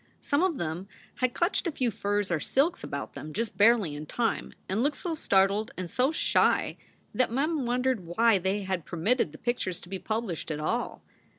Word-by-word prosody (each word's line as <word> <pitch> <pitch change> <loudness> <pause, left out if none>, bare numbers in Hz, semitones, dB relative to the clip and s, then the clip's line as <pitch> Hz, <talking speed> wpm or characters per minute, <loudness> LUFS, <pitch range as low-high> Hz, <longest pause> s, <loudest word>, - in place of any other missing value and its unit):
Some 285 +2 +1
of 365 -5 +1
them 170 +3 -3 0.3
had 255 -1 0
clutched 350 +1 +1
a - - 0
few 255 -5 0
furs 205 -2 -1
or 165 - +2
silks 300 - +1
about 140 - -5
them 155 0 -7
just 225 +1 -2
barely 210 -6 +4
in 150 +1 -7
time, 235 +6 -1 0.2
and 195 +4 +1
looked 285 +2 +1
so 345 -3 -3
startled 200 -5 +2
and 185 - -3
so 260 +4 +2
shy 320 - +2 0.4
that 255 - +2
Mem 280 +1 0
wondered 250 0 +1
why 210 +4 +4
they 190 +3 -1
had 185 -3 -2
permitted 180 - +1
the 155 - -11
pictures 190 -7 -2
to 175 - -12
be 190 0 -4
published 215 -8 -3
at 150 -1 -2
all. 230 +11 -2
220 Hz, 195 wpm, -28 LUFS, 185-255 Hz, 0.4 s, barely